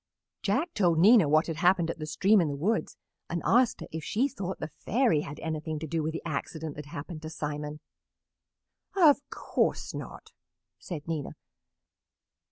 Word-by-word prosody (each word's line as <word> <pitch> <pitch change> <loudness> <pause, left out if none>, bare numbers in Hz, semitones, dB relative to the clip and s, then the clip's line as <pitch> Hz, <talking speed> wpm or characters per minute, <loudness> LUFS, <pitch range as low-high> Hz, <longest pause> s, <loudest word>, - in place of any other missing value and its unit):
Jack 280 - 0
told 175 -5 +2
Nina 195 -2 +7
what 155 +2 +4
had 165 -2 -4
happened 175 -1 +3
at - - -9
the 155 - -5
stream 195 +6 +4
in 165 - +1
the 145 - -2
woods 200 +11 -1 0.3
and 170 - -1
asked 245 0 +3
her - - -6
if 160 -1 -5
she 240 - +1
thought 195 -9 -5
the 155 - -5
Fairy 230 - +2
had 145 0 -7
anything 155 -1 -3
to 155 - -5
do 160 +1 -1
with 155 +1 -1
the 165 - -6
accident 155 0 -4
that 150 0 -8
happened 155 +3 -7
to 155 - -6
Simon. 150 -1 -4 1.2
"Of 300 -6 +6
course - - -1
not," - - -8 0.5
said 160 -5 -7
Nina. 160 -4 -3
165 Hz, 175 wpm, -29 LUFS, 155-200 Hz, 1.2 s, Nina